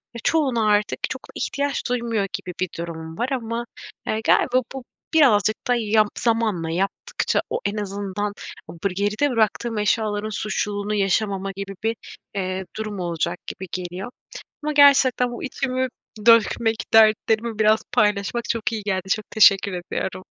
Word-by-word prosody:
ya, 235 - -5
çoğuna 260 -9 +2
artık 205 0 +1
çok - - -5
ihtiyaç 280 -2 -2
duymuyor 230 -4 0
gibi 180 - -5
bir 185 -2 0
durumum 165 -1 -6
var. 240 +2 -1
Ama, 235 -2 -2 0.4
eee, 220 +1 -1
galiba 255 0 +4
bu 265 -2 -6 0.3
birazcık 215 -9 +5
da 245 - +3
yap 215 -2 +3
zamanla 220 -8 0
yaptıkça 195 - -1
o - - -1
en 205 +1 -1
azından 205 0 -3 0.3
o 165 - -9
bır 200 - +1
geride 205 +9 0
bıraktığım 225 0 0
eşyaların 210 0 0
suçluluğunu 205 0 -2
yaşamamak 195 -1 0
gibi 195 0 -6
bir, 225 +1 +1 0.4
eee, 185 0 -2
durum 215 -3 -4
olacak 170 0 -2
gibi 190 - -6
geliyor. 185 +5 -5 0.5
Ama 300 0 -1
gerçekten 270 -4 +5
bu 240 - -7
içimi 260 -1 -1 0.4
dökmek, 230 0 +5 0.2
dertlerimi 220 0 +4
biraz 215 0 +4
paylaşmak 210 +3 +1
çok 230 0 -1
iyi 215 -2 -3
geldi. 190 -2 -2
Çok 215 +1 -1
teşekkür 200 -3 +5
ediyorum. 180 +1 -4
215 Hz, 145 wpm, -23 LUFS, 195-235 Hz, 0.5 s, birazcık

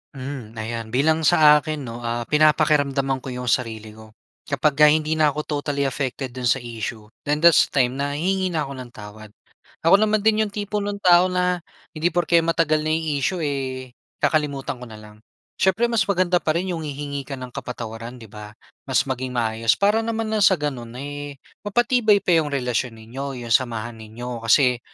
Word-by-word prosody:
Hmm, 130 -4 -7
ayan 115 0 -5
bilang 150 +7 +2
sa 150 -1 +6
akin 155 -2 -5
'no, 115 -1 -7
ah 120 0 -3
pinapakiramdaman 145 -2 +2
ko 130 - -11
'yong 125 -1 -4
sarili 110 -3 -2
ko. 110 0 -15 0.3
Kapagka 150 0 +3
hindi 155 +1 +2
na 155 - +5
ako 150 +1 -2 0.2
totally 140 -1 -2
affected 135 -1 -3
do'n 125 -1 -3
sa 120 - +1
issue 110 -2 -6 0.2
then 150 +2 0
that's 170 -1 +6
the - - -28
time 125 +3 -3
na 145 0 -2
hihingi 190 +4 0
na 160 -4 -1
ako 140 - -7
ng 120 -1 -9
tawad. 105 0 -11 0.5
Ako 195 +5 +6
naman 215 -1 +2
din 220 0 +3
'yong 205 -2 -5
tipo 210 0 -3
no'ng 205 0 -4
tao 180 0 +6
na 180 -1 0 0.3
hindi 165 +1 -1
porke 175 -1 +2
matagal 165 -2 +1
na - - -2
'yong 160 -1 -3
issue 175 +4 -1
eh 130 -3 -3 0.3
kakalimutan 140 -4 0
ko 125 - -9
na 110 - -11
lang. 105 0 -14 0.4
Siyempre 195 +5 +2
mas 215 -4 +2
maganda 180 -2 +2
pa 155 0 -1
rin 180 +2 -1
'yong 165 -2 -4
hihingi 140 -1 -5
ka 135 - -5
ng 130 -1 -8
kapatawaran, 115 0 -7
'di 110 - -13
ba? 105 0 -10 0.3
Mas 130 0 +2
maging 130 -2 -4
maayos 115 -1 +1
para 205 +3 +2
naman 225 -1 -2
na 215 - +1
sa 190 -1 +5
gano'n 135 -7 -4
eh, 145 +1 -6 0.3
mapatibay 220 -2 +3
pa 180 - +1
'yong 150 - -1
relasyon 125 -2 -1
ninyo, 125 +3 -7
'yong 115 - -7
samahan 115 -2 0
ninyo, 115 +2 -7
kasi 125 +2 +3
140 Hz, 195 wpm, -22 LUFS, 120-165 Hz, 0.5 s, sa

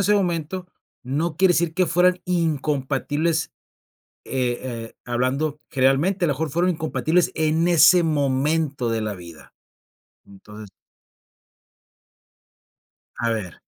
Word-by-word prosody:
ese 210 +2 +3
momento, 180 -1 -1 0.4
no 150 +5 -2
quiere 185 0 +4
decir 165 -1 0
que 185 -2 +2
fueran 180 +2 +2
incompatibles, 155 -1 -1 0.7
eh 125 -2 -1
eh, 115 -3 -6
hablando 135 +5 -1
generalmente, 140 +9 +2
a - - 0
lo 145 - +1
mejor, 160 +2 -3
fueron 175 +5 +1
incompatibles 160 +1 0
en 160 +2 +1
ese 175 +1 +6
momento 145 -2 0
de 115 -1 -1
la 105 -1 -3
vida. 85 -3 -13 0.7
Entonces 105 +1 -13 2.5
A 115 0 0
ver. 100 -7 -4
150 Hz, 115 wpm, -22 LUFS, 130-170 Hz, 2.5 s, ese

